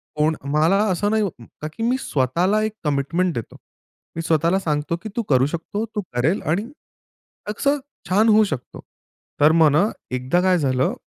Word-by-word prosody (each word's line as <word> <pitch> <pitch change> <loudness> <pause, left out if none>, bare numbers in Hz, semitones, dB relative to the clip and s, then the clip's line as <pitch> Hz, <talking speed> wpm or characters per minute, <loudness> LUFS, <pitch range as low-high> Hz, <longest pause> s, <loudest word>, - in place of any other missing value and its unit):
कोण 155 +1 +2 0.2
मला 160 +6 +3
असं 205 +4 0
नाही 220 -1 +2 0.2
कारण 150 +6 -9
की 225 - -3
मी 250 +3 +2
स्वतःला 175 - +1
एक 215 0 -2
कमिटमेंट 155 +5 0
देतो. 115 - -6 0.6
मी 165 - -2
स्वतःला 165 +3 +2
सांगतो 150 -1 -1
की 215 - -5
तू 235 - 0
करू 130 -1 +4
शकतो, 175 +7 -4
तू 215 -2 -4
करेल 140 +11 +1
आणि 205 - -2 0.8
असं 280 +7 +1 0.3
छान 215 +4 +4
होऊ 215 0 +6
शकतो. 140 -9 -6 0.6
तर 150 +2 +7
मग 155 -2 +6
ना 175 +8 +3 0.3
एकदा 130 +8 +1
काय 185 -1 +3
झालं 130 -2 +1
170 Hz, 170 wpm, -22 LUFS, 150-210 Hz, 0.8 s, तर